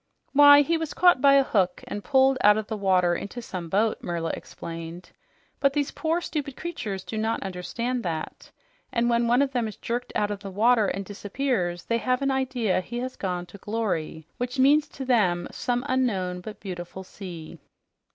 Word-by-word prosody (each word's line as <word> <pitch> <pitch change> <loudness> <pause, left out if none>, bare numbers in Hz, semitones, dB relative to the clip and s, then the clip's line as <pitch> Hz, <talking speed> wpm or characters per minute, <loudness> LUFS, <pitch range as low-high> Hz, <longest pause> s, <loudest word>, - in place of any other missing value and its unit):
"Why, 285 0 +9
he 330 +3 0
was 320 -2 -4
caught 355 -7 +5
by 275 0 +6
a 275 - +6
hook 190 -8 0
and 205 - -5
pulled 265 -1 +3
out 210 +1 +7
of 215 - -2
the 220 - -4
water 185 -3 +2
into 200 +7 -5
some 185 -7 -6
boat," 210 +5 +1
Merla 170 -1 -2
explained. 165 +1 -8 0.5
"But 275 -1 +3
these 290 -1 0
poor 330 +2 -1
stupid 285 -5 -4
creatures 210 - -5
do 220 - -5
not 225 +1 -1
understand 230 +7 -3
that, 165 -6 -5 0.4
and 240 0 +1
when 235 0 +2
one 245 +4 +4
of 275 - -2
them 245 -3 0
is 215 - -7
jerked 240 +1 -4
out 210 0 +1
of 205 - -4
the 200 -1 -7
water 220 +2 +3
and 195 0 -3
disappears, 200 -3 -2
they 230 0 0
have 255 +1 +1
the 275 0 +1
idea 250 -8 0
he 240 +6 -7
has 255 +1 -4
gone 180 -2 -3
to 200 - -13
glory, 185 -8 -3
which 250 +2 -3
means 290 +3 +5
to 270 -2 -7
them 185 -9 +2
some 245 +1 -2
unknown 195 -9 0
but 210 +3 -9
beautiful 180 -1 -7
sea." 170 -4 -9
220 Hz, 190 wpm, -26 LUFS, 185-260 Hz, 0.5 s, Why